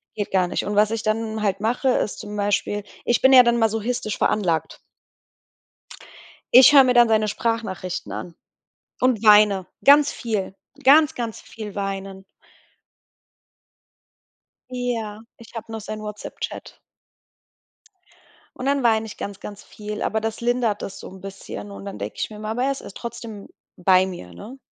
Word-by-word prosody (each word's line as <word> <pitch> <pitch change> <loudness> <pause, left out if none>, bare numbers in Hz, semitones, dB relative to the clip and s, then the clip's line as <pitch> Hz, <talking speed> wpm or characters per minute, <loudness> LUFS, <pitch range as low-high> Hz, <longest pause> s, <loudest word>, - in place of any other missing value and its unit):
geht 205 -2 -4
gar 185 -2 +2
nicht. 175 - -2
Und 205 - -3
was 210 +1 +3
ich 225 -1 -3
dann 220 0 -2
halt 200 -2 0
mache, 240 +5 0
ist 245 - 0
zum 210 0 -7
Beispiel, 205 0 -1 0.2
ich 240 - +1
bin 265 0 +6
ja 255 - +10
dann 235 0 +2
masochistisch 225 0 -1
veranlagt. 170 -7 0 1.8
Ich 255 +2 +9
höre 275 -2 +9
mir 250 - +3
dann 240 -1 +6
seine 215 -1 +2
Sprachnachrichten 210 -4 -3
an 170 - -7 0.7
und 250 -4 +2
weine, 210 -3 +6 0.2
ganz 285 +1 +6
viel. 210 -5 -3 0.3
Ganz, 300 +3 +6
ganz 230 -3 -5
viel 210 -3 -9
weinen. 195 -1 -5 2.5
Ja, 235 -4 -4 0.2
ich 230 - -16
hab 225 0 -7
noch 225 - -5
seinen 215 0 -7
Whatsapp-Chat. 210 0 -7 1.8
Und 255 - -5
dann 280 0 +1
weine 225 -2 +2
ich 220 - -10
ganz, 200 -1 -6
ganz 205 -1 -9
viel, 210 0 -8
aber 220 - 0
das 225 +1 -4
lindert 235 -3 0
das 195 - -7
so - - -9
'n 190 0 -13
bisschen. 195 - -8
Und 100 0 -10
dann 105 - -7
denke 100 +2 -5
ich - - -3
mir 210 - -9
immer, 215 0 -6
aber 235 +3 -1
er 275 - +1
is 275 - -5
er - - -10
ist 200 - -10
trotzdem 225 -3 -8 0.3
bei 185 +1 +3
mir, 90 - -9
ne? 235 - -11
215 Hz, 165 wpm, -22 LUFS, 200-235 Hz, 2.5 s, ja